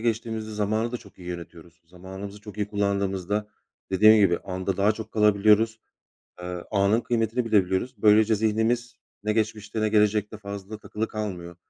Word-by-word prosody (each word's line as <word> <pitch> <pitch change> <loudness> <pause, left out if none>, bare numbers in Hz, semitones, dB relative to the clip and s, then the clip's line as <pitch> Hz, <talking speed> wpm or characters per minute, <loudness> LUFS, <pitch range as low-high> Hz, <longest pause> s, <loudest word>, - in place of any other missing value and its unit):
geçtiğimizde 110 -1 -2
zamanı 110 +2 -1
da 125 - -1
çok 100 -4 -17
iyi 90 -1 -9
yönetiyoruz. 85 -1 -9
Zamanımızı 95 +4 -9
çok 105 -1 -11
iyi 105 -1 -2
kullandığımızda, 100 0 -1 0.4
dediğim 110 +3 +7
gibi 95 -5 +4
anda 95 +1 -3
daha 100 +2 +3
çok 110 0 -9
kalabiliyoruz. 105 +1 +3 0.6
Eee, 90 0 -5
anın 100 +3 +3
kıymetini 115 0 0
bilebiliyoruz. 100 +1 +1
Böylece 110 +1 +5
zihnimiz, 110 +3 0 0.3
ne 105 0 0
geçmişte 110 0 -2
ne 110 - +2
gelecekte 105 0 +2
fazla 100 0 -7
takılı 110 +1 -4
kalmıyor. 90 -5 -5
105 Hz, 150 wpm, -25 LUFS, 95-110 Hz, 0.6 s, dediğim